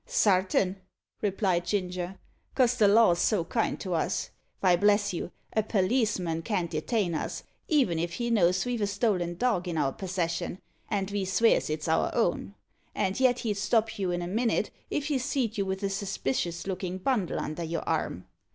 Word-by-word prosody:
"Sartin," 190 - +2 0.4
replied 190 -3 +1
Ginger, 180 -1 -2 0.4
"cos 250 -2 +4
the 215 -4 +4
law's 200 -4 +5
so 205 -6 +2
kind 225 +6 -1
to 185 -3 -3
us. 170 +3 -1 0.3
Vy, 180 -2 +4
bless 205 +2 +3
you, 175 - -4 0.2
a 220 - +3
perliceman 195 -5 0
can't 180 -5 -1
detain 175 +4 0
us, 155 - -3 0.2
even 255 - +2
if 170 +1 -2
he 235 +4 -2
knows 185 -4 +3
ve've 245 -2 -2
a 205 - +2
stolen 195 -4 0
dog 200 -6 +1
in 170 -2 -2
our 140 -3 +1
persession, 180 -1 -3 0.3
and 200 -2 -1
ve 200 0 -1
svears 195 +2 +3
it's 155 +1 -3
our 160 - +2
own; - - 0 0.4
and 190 +3 0
yet 250 -2 +3
he'd 210 -3 -1
stop 220 +1 +1
you 190 -2 0
in 175 0 -1
a - - -4
minnit 230 +5 0 0.2
if 290 - -1
he 290 -3 0
seed 255 -4 -1
you 200 -2 -1
with 190 +1 -3
a 200 - +1
suspicious 175 -4 -2
lookin' 185 -1 -3
bundle 205 -2 0
under 155 +3 -4
your 165 0 -4
arm. - - -1
195 Hz, 180 wpm, -28 LUFS, 175-220 Hz, 0.4 s, law's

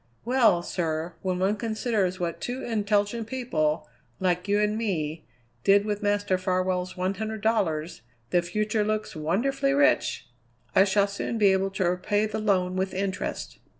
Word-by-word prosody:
"Well, 230 -8 +4
sir, 165 -1 -2
when 185 -1 -1
one 195 +3 +1
considers 215 -4 -1
what 170 -1 -3
two 250 +2 -4
intelligent 210 0 0
people, 155 -12 -1 0.3
like 180 0 0
you 205 +1 +2
and 210 0 +1
me, 165 -8 -2 0.4
did 200 +1 +5
with 210 -1 -2
Master 205 -2 +1
Farwell's 185 0 -1
one 185 +1 0
hundred 220 +1 -4
dollars, 180 - 0 0.3
the 175 - +4
future 210 +4 0
looks 215 -2 -2
wonderfully 260 - 0
rich! 290 - +2 0.5
I 190 - +7
shall 200 0 +3
soon 200 +3 -3
be 205 -3 +5
able 190 0 +1
to 190 -2 -1
repay 195 +4 +1
the 215 0 -3
loan 185 -4 +1
with 190 0 -1
interest." 190 0 -3
200 Hz, 155 wpm, -26 LUFS, 180-215 Hz, 0.5 s, I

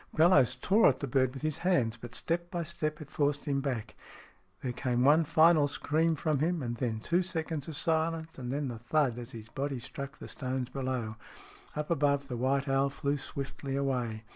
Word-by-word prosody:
Bellowes 155 -6 +5
tore 195 - +5
at 130 - -1
the - - -2
bird 130 -1 +2
with 135 +2 -9
his 155 -2 -1
hands, 165 -12 +2
but 120 0 -9
step 170 +1 -2
by 175 -2 -2
step 155 -1 -3
it 155 0 -10
forced 145 -1 0
him 140 -2 0
back. 120 -6 -3 0.7
There 130 - -1
came 125 0 0
one 155 +4 +5
final 160 -1 +5
scream 160 +3 +1
from 150 -1 0
him, 165 0 0
and 120 -1 -2
then 115 -3 -2
two 170 +9 +2
seconds 160 -5 -3
of 160 - -5
silence, 160 0 -1
and 125 -1 -4
then 140 0 -1
the 115 -2 -6
thud 125 0 +1
as 120 - -8
his 115 -1 -9
body 135 +2 -3
struck 140 +4 -7
the - - -9
stones 130 -1 -3
below. 130 -5 -3 0.6
Up 150 +2 -3
above, 140 -2 +2
the 125 - -3
white 135 +3 +1
owl 135 +1 +2
flew 140 +1 -1
swiftly 135 0 -5
away. 125 -5 -1
140 Hz, 200 wpm, -31 LUFS, 125-155 Hz, 0.7 s, Bellowes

